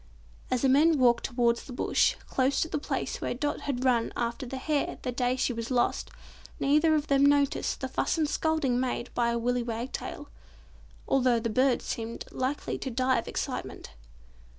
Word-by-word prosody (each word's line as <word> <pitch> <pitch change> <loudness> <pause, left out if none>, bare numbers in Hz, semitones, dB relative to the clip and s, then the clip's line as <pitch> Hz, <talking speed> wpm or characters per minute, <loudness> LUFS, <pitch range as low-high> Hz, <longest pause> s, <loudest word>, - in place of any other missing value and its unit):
As 255 -1 0
the - - +5
men 305 +4 +5
walked 245 -2 +3
towards 240 -2 +1
the 255 - -9
bush, - - +2
close 265 +1 +1
to - - +1
the 300 - -2
place - - -3
where - - -2
Dot 290 +3 -2
had 265 -2 -2
run 240 -3 +2
after 235 +2 -2
the 265 - -5
hare 290 +2 -1
the 250 - -2
day 245 0 0
she 260 -1 0
was 230 0 -5
lost, 245 -2 0 0.5
neither 305 +3 +3
of 300 -1 0
them 275 -2 +3
noticed 285 0 +2
the - - -1
fuss - - -1
and 315 -2 +2
scolding 300 -5 0
made 250 -1 -2
by 235 -1 +1
a 235 - 0
Willy 245 +1 0
Wagtail; 240 +5 -5 0.8
although 250 -3 +3
the 230 0 -2
little 255 +5 +3
bird - - -9
seemed 230 0 -5
likely 260 +3 -2
to 265 - -4
die 255 0 +1
of - - -7
excitement. - - -5
255 Hz, 190 wpm, -28 LUFS, 240-280 Hz, 0.8 s, the